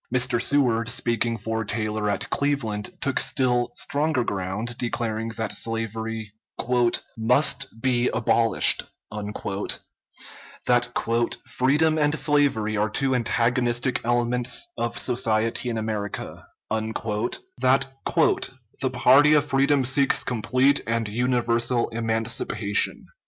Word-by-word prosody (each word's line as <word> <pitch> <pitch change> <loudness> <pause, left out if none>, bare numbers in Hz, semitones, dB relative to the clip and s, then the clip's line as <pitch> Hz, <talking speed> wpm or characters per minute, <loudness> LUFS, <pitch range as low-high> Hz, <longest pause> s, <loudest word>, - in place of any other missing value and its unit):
Mr. 125 -2 +2
Seward, 120 -5 +2
speaking 115 -1 0
for 110 0 -3
Taylor 110 -1 -2
at 100 - -2
Cleveland, 135 -8 -1
took 140 -2 0
still 125 -2 +1
stronger 145 -3 0
ground, 100 +3 -4
declaring 115 -2 -2
that 110 -2 -3
slavery 115 -1 -3 0.8
"must 130 +5 +2
be 125 -1 +1
abolished;" 115 -1 +3 1.8
that 120 -1 +1
"freedom 155 +5 +2
and 150 +1 +2
slavery 135 -7 +2
are 105 +1 +1
two 130 +4 0
antagonistic 120 +1 0
elements 120 - 0
of 120 - -3
society 115 -1 0
in 115 - -2
America;" 110 -2 -5 0.2
that 115 - -1 0.2
"the 130 +1 -1
party 140 +4 +5
of 145 -1 +3
freedom 135 -1 +2
seeks 135 +2 +3
complete 130 +3 +2
and 115 -1 -1
universal 120 +1 +1
emancipation." 115 -2 -1
120 Hz, 100 wpm, -24 LUFS, 110-130 Hz, 1.8 s, party